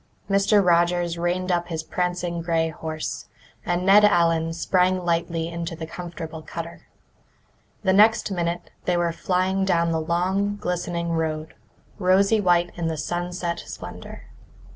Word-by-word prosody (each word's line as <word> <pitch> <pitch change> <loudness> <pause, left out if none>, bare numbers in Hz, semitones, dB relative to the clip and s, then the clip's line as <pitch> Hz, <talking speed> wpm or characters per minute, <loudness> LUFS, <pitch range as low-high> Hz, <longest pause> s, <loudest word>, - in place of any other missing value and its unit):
Mr. 200 0 +3
Rogers 175 0 +2
reined 180 +2 0
up 175 -1 0
his 160 -2 -4
prancing 175 0 -2
grey 165 -1 +1
horse, 155 0 -5 0.4
and 175 +1 -1
Ned 200 +2 +7
Allen 165 -4 +3
sprang 180 +2 +1
lightly 165 -1 0
into 170 0 -5
the 160 0 -6
comfortable 165 -1 -7
cutter. 165 +2 -8 1.0
The 190 -2 +3
next 210 +1 +4
minute 175 -1 -2
they 180 -1 +1
were 170 -1 +1
flying 185 +3 0
down 170 -3 +2
the 160 -1 0
long, 190 +5 0
glistening 175 -3 -2
road, 160 -1 -2 0.5
rosy 195 +3 +4
white 175 -2 +3
in 170 -2 -2
the 160 -1 -2
sunset 175 +1 -3
splendour. - - -9
175 Hz, 140 wpm, -24 LUFS, 165-185 Hz, 1.0 s, Ned